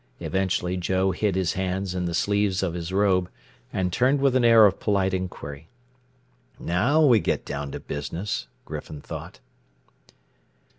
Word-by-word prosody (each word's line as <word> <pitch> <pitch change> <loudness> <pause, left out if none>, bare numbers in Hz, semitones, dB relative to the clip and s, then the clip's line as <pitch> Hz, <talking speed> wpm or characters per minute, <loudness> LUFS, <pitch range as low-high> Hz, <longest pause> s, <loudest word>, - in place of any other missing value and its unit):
Eventually 95 -1 -1
Joe 95 +2 +1
hid 95 +1 0
his 95 -3 0
hands 95 0 -2
in 90 -1 -2
the 85 -1 -2
sleeves 100 +1 +1
of 90 -3 -1
his 85 0 -5
robe 95 -2 +2 0.4
and 90 -2 -1
turned 130 +6 +3
with 135 -2 +2
an 130 - +3
air 115 -2 +8
of 100 -2 +2
polite 95 -3 +1
inquiry. 80 -5 -5 0.9
Now 140 - +2
we 120 -6 +6
get - - -1
down 70 -1 -4
to - - -4
business, 85 +8 -4 0.2
Griffin 75 -2 -7
thought. - - -8
95 Hz, 150 wpm, -25 LUFS, 90-105 Hz, 0.9 s, air